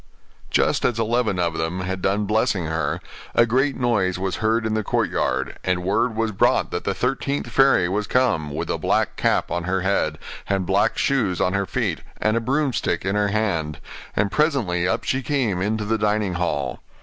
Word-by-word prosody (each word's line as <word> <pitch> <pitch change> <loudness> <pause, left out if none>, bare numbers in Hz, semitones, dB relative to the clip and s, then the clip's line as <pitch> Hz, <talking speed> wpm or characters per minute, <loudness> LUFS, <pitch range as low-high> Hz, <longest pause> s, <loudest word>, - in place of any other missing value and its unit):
Just - - +2
as 120 - +1
eleven 115 -3 +1
of 85 -2 -1
them 80 +3 -2
had 95 0 -3
done 100 +3 +1
blessing 105 -3 +1
her, 80 +1 -1 0.4
a 115 - +6
great 130 +4 +1
noise 105 -8 +1
was 95 0 -2
heard 110 +1 +1
in 110 - 0
the 110 0 0
courtyard, 65 -8 -1
and 90 -1 0
word 110 +5 +1
was 110 0 0
brought 95 - +2
that - - -3
the - - 0
thirteenth 140 +1 -1
fairy 135 -10 +4
was 100 +3 -1
come, 120 -13 +1
with 80 +3 -3
a - - -2
black - - +1
cap - - +1
on 85 0 -2
her 95 +1 0
head, 90 -5 0 0.3
and 95 -2 +1
black 100 +4 +2
shoes 110 -10 +1
on 90 - +1
her 100 -1 0
feet, - - -1 0.2
and 110 +1 +1
a 115 - +1
broomstick 130 - 0
in 95 - 0
her 105 0 +2
hand: 100 -8 -1 0.4
and 100 0 +1
presently 120 - +1
up 95 - 0
she 130 - 0
came 125 -10 0
into 105 +2 -1
the 110 +1 0
dining 105 -2 +1
hall. 75 -7 -2
100 Hz, 195 wpm, -23 LUFS, 90-115 Hz, 0.4 s, a